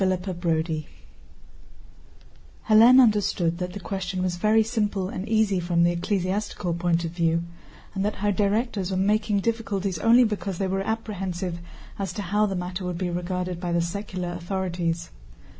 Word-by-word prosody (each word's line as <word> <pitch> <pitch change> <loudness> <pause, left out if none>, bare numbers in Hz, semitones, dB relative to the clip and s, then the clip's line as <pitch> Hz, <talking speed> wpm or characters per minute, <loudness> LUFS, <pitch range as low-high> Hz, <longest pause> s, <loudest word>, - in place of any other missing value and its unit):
CHAPTER 185 0 0
VII 160 -2 -1 1.8
Hélène 230 +4 +8
understood 200 -7 +3
that 180 0 -4
the 205 - -6
question 185 0 -3
was 180 -1 -1
very 215 +4 +4
simple 210 -4 -1
and 190 0 -5
easy 215 -4 +2
from 170 -1 +1
the 175 - +4
ecclesiastical 185 0 -1
point 170 0 0
of 165 - -3
view, 170 -1 +1 0.5
and 195 -1 -1
that 210 +1 -1
her 205 +1 0
directors 205 0 0
were 190 - -1
making 210 +1 +1
difficulties 200 -5 -2
only 235 +5 +6
because 200 -4 -2
they 195 - -1
were 190 +1 -1
apprehensive 195 -5 -3 0.4
as 190 -3 -3
to 205 - -4
how 210 +3 +1
the 195 - -2
matter 180 +1 -4
would 180 -1 -3
be 180 -1 -2
regarded 180 0 -3
by 175 - -2
the 170 - +2
secular 180 +1 -3
authorities. 175 -1 -3
185 Hz, 160 wpm, -25 LUFS, 175-205 Hz, 1.8 s, Hélène